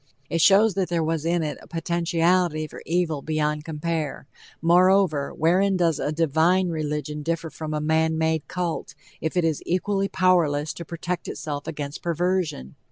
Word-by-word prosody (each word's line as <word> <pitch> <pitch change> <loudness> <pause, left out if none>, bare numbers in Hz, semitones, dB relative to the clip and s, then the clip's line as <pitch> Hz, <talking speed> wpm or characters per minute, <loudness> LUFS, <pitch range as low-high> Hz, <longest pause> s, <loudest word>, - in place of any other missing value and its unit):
It 165 - +1
shows 200 +4 +6
that 185 -1 -1
there 170 -2 0
was 160 -1 -1
in 170 0 +1
it 150 - -4
a - - -15
potentiality 170 -1 +1
for - - -10
evil 165 -3 0
beyond 150 0 -1
compare. 160 -2 -3 0.3
Moreover, 175 -3 +3
wherein 185 +4 +2
does 165 -4 +1
a 150 - -1
"divine" 165 +4 +2
religion 150 -1 -3
differ 165 +1 -3
from 155 -1 -6
a 155 - -1
man 160 +1 +1
made 160 -1 0
cult, 175 -3 -3 0.3
if 160 +3 -2
it 175 - +3
is 160 -3 0
equally 195 +2 0
powerless 160 -6 +2
to 170 - -8
protect 170 +2 -4
itself 145 0 -5
against 145 -2 -5
perversion? 170 - -1
165 Hz, 165 wpm, -24 LUFS, 155-180 Hz, 0.3 s, shows